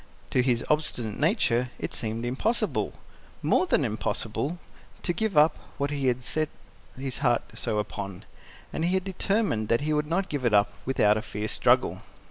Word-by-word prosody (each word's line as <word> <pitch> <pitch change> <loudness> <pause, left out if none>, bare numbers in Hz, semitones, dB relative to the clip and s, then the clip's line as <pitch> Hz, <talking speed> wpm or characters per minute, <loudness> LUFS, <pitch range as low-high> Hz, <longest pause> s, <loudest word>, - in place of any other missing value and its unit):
To 125 - +4
his 120 -2 +1
obstinate 125 -8 0
nature 130 - +2
it - - -4
seemed 115 +1 -3
impossible 175 - 0 0.5
more 370 - +3
than 150 - +3
impossible 115 +7 -2 0.5
to 175 - +1
give 215 -2 -1
up 150 +2 +6 0.2
what 140 0 -1
he 140 -2 0
had 125 0 +1
so - - -4
set 155 - 0 0.5
his 135 -1 -4
heart 120 -4 +2 0.2
upon. 100 -3 -3 0.5
And 160 - -1
he 180 +2 +2
had 190 - +1
determined 195 - 0
that 115 +4 +2
he 155 +1 0
would 150 0 +1
not 185 +4 0
give 145 -6 -3
it 115 -4 +3
up 100 0 +4
without 105 -5 +4
a - - -1
fierce 105 -1 -4
struggle. - - +3
130 Hz, 175 wpm, -27 LUFS, 115-160 Hz, 0.5 s, up